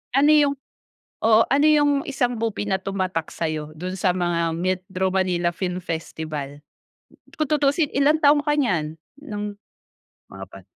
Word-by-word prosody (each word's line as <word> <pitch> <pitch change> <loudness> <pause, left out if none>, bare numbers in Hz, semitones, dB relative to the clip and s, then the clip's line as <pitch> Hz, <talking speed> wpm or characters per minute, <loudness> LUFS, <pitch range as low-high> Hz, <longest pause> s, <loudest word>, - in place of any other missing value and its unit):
Ano 290 +2 +5
yung 290 -2 +4 0.7
oo, 220 0 +6
ano 285 +3 +3
yung 295 -1 +4 0.2
isang 245 -3 -1
movie 215 -2 -2
na 190 0 +1
tumatak 185 -4 -3
sa 165 - -2
'yo 155 -1 -5
do'n 185 +4 -5
sa 180 -1 +2
mga 170 -2 0
Metro 185 +1 -2
Manila 180 -2 +1
Film 180 0 -3
Festival? 155 -4 -5 0.8
Kung 310 -3 -1
tutuusin 295 +1 +2
ilang 300 +3 +3
taon 290 0 +5
ka 295 - +1
niyan 170 - 0 0.3
ng 210 -8 -5 0.9
mga 95 0 -8
pan 95 -2 -14
190 Hz, 150 wpm, -23 LUFS, 170-280 Hz, 0.9 s, oo